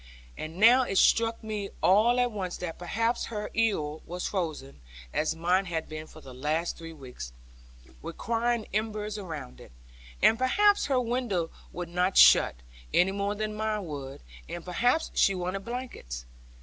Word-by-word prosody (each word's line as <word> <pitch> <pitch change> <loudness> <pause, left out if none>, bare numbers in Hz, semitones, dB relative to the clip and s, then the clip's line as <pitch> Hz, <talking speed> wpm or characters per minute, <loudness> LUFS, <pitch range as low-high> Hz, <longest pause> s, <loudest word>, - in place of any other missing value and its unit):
And 160 +2 -7
now 235 +6 +7
it 195 -6 -1
struck 230 +3 +3
me 210 -2 -4
all 220 +6 +5
at 245 -1 +2
once 190 -4 -4
that 175 -2 -6
perhaps 230 +7 0
her 210 -2 -5
ewer 160 -10 0
was 180 +1 -3
frozen 155 - -4 0.3
(as 155 +1 0
mine 180 +4 +2
had 165 -3 -3
been 155 0 -7
for 155 - -14
the 130 -3 -11
last 155 +6 -1
three 165 -1 -9
weeks, 125 - -9 0.7
requiring 230 +7 -1
embers 215 0 -2
around 155 -9 -7
it), - - -14 0.5
and 225 - +5
perhaps 405 +11 +3
her 270 -3 +2
window 235 -9 -1 0.2
would 175 -1 -6
not 180 +2 0
shut, - - +7 0.4
any 180 +2 +4
more 200 +1 -1
than 215 0 -3
mine 215 -2 -2
would; 140 -4 -7 0.3
and 175 - -6
perhaps 245 - +1
she 195 - +3
wanted 185 +2 -3
blankets. 235 - -6
195 Hz, 160 wpm, -28 LUFS, 165-225 Hz, 0.7 s, now